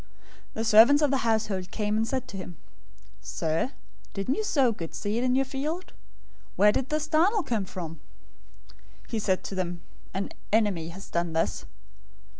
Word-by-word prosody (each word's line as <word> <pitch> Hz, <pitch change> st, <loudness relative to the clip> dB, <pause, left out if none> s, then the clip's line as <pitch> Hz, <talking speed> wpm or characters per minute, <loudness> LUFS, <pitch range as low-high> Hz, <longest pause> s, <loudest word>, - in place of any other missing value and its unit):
013:027 -, -, -26 dB, 0.5 s
The 225 Hz, -, -1 dB
servants 230 Hz, +7 st, +7 dB
of 290 Hz, -, +3 dB
the 275 Hz, -, +3 dB
householder 220 Hz, -6 st, 0 dB
came 210 Hz, 0 st, -1 dB
and 220 Hz, +1 st, +1 dB
said 260 Hz, 0 st, -2 dB
to 195 Hz, -, -6 dB
him, 180 Hz, -3 st, -8 dB, 0.6 s
'Sir, 165 Hz, +10 st, -1 dB, 0.4 s
didn't 195 Hz, +6 st, 0 dB
you 435 Hz, -, -1 dB
sow 275 Hz, -, +3 dB
good 165 Hz, -7 st, -6 dB
seed 215 Hz, +4 st, -1 dB
in 255 Hz, 0 st, +2 dB
your 270 Hz, +1 st, +3 dB
field? 300 Hz, +7 st, -4 dB, 0.6 s
Where 210 Hz, +1 st, +6 dB
did 250 Hz, +4 st, -2 dB
this 305 Hz, 0 st, 0 dB
darnel 350 Hz, +7 st, +3 dB
come 220 Hz, -8 st, -1 dB
from?' 165 Hz, -4 st, -7 dB, 1.1 s
013:028 -, -, -22 dB
"He 225 Hz, -, -1 dB
said 190 Hz, -3 st, 0 dB
to -, -, -6 dB
them, 175 Hz, -2 st, -3 dB, 0.3 s
'An 195 Hz, +1 st, -2 dB, 0.2 s
enemy 200 Hz, -7 st, +2 dB
has 190 Hz, +4 st, -9 dB
done 170 Hz, -1 st, -1 dB
this.' 160 Hz, -, 0 dB
215 Hz, 175 wpm, -27 LUFS, 185-265 Hz, 1.1 s, servants